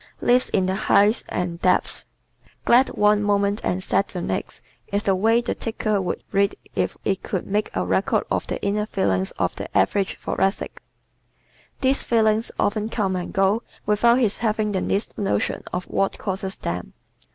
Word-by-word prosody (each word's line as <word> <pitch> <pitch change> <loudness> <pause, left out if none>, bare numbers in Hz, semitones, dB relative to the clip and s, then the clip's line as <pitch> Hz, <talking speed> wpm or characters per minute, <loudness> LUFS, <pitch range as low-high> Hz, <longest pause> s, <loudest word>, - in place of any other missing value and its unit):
Lives 250 +1 +3
in 185 - +1
the 185 - 0
Heights 205 +3 +3
and 175 -1 -3
Depths 185 - +1 0.4
¶ - - -35
"Glad 250 +3 +5
one 210 0 +3
moment 205 0 +1
and 185 +1 -1
sad 200 - +1
the 180 - -6
next" 95 - -4 0.3
is 200 +1 0
the 195 - +2
way 225 +5 +3
the 240 - -2
ticker 215 -3 -1
would 180 - -3
read 200 0 +2 0.2
if - - -1
it 195 -1 0
could 185 - -3
make 210 +2 -1
a - - 0
record - - +1
of - - 0
the - - -3
inner 210 +1 0
feelings 95 - 0
of - - 0
the - - -3
average 190 - +1
Thoracic. 195 +1 -1 1.0
These 265 +1 +2
feelings 220 -1 +2
often 215 +1 0
come 195 -5 -1
and 180 -1 -4
go 195 +3 +2 0.2
without 235 +3 +4
his 225 -6 +1
having 215 -1 0
the 190 -2 -1
least 200 +3 -2
notion 200 -1 0
of 180 - -2
what 195 - -1
causes 190 -1 -3
them. 90 -6 -4
200 Hz, 175 wpm, -23 LUFS, 190-215 Hz, 1.0 s, Glad